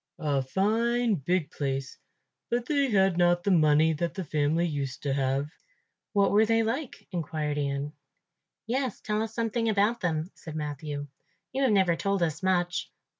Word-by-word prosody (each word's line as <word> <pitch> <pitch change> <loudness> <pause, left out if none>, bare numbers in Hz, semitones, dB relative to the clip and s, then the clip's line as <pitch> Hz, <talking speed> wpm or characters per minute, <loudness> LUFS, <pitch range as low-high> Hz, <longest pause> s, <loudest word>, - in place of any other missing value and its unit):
"A 145 -5 0
fine 225 - +1
big 175 -1 0
place, 135 -2 -3 0.5
but 240 0 0
they 280 -1 +1
had 190 -4 +3
not 175 0 +3
the 200 - +2
money 155 -1 +4
that 170 +2 -2
the 190 - -3
family 155 +2 +1
used 140 -5 -3
to 140 -2 0
have." 135 +2 0 0.6
"What 200 -2 +3
were 210 +2 +5
they 225 +1 +3
like?" 245 +5 -4
inquired 155 -4 -2
Ian. 140 +1 -2 0.7
"Yes, 255 0 -1
tell 210 0 -1
us 220 0 -4
something 230 0 0
about 215 +3 +2
them," 160 0 -1
said 160 -2 -9
Matthew; 145 -1 -4 0.5
"you 270 - -1
have 265 -4 +3
never 190 -4 +4
told 195 +1 0
us 160 -1 -1
much." 180 -1 0
175 Hz, 165 wpm, -28 LUFS, 150-215 Hz, 0.7 s, were